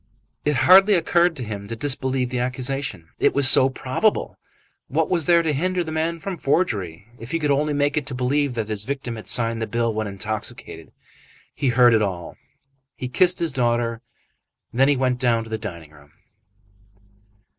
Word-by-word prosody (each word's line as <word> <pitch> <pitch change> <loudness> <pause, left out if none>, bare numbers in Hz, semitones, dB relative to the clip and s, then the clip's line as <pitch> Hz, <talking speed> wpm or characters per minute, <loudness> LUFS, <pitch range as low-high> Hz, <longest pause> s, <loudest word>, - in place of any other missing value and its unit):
It 150 0 +1
hardly 195 +3 +7
occurred 170 0 +2
to 130 - -6
him 100 -2 -7
to 115 - -5
disbelieve 130 0 -2
the 125 - -2
accusation. 130 - -3
It - - +2
was 140 -1 +7
so 130 0 +7
probable! 130 +11 -1 0.5
What - - -1
was 170 -4 +1
there 170 -1 +4
to 155 -2 0
hinder 180 +5 -1
the 160 - -7
man 165 +2 -2
from 185 +2 -5
forgery, 100 - -1
if 115 - -10
he 165 - -1
could 150 -3 -1
only 150 +2 +1
make 145 0 0
it 140 -3 -2
believed 135 +1 0
that 110 -2 -3
his 105 -2 -2
victim 135 -1 -5
had 110 - -10
signed 115 -1 +1
the 110 - -2
bill 115 -1 -1
when 110 0 -3
intoxicated? 100 +2 -6 0.6
He 145 - -2
heard 120 0 +5
it 110 - +3
all; 90 -5 -4 0.8
kissed 180 0 +4
his 170 -3 -1
daughter, 120 -3 -1 0.7
and 120 - -7
then 135 +1 +4
went 125 -1 0
down 115 -3 +1
to 110 - -13
the 110 - -3
dining 85 -8 -8
room. 75 -1 -19
130 Hz, 180 wpm, -22 LUFS, 115-150 Hz, 0.8 s, hardly